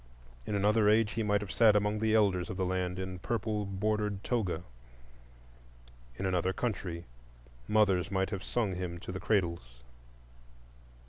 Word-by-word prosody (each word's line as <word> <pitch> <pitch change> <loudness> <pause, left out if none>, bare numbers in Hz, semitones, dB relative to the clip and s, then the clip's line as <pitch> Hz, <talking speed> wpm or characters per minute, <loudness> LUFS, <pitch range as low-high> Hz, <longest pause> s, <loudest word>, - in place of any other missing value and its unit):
In 105 - -1
another 105 +1 +3
age 110 0 +4
he 115 - -2
might 105 -1 +1
have 100 -2 -6
sat 110 -3 +5
among 105 +1 +1
the 110 0 +2
elders 95 -5 +2
of 90 - -5
the 95 - 0
land 90 0 -1
in 95 -1 -5
purple 105 0 -2
bordered 105 0 -1
toga; 95 -9 -1 1.5
in - - -3
another 95 0 +1
country 90 -6 -3 0.6
mothers 100 -5 +3
might 95 0 0
have 100 -3 -3
sung 110 -6 -1
him 90 -1 -4
to 90 - -7
the 95 - -5
cradles. 85 - -1
100 Hz, 150 wpm, -31 LUFS, 90-105 Hz, 1.5 s, sat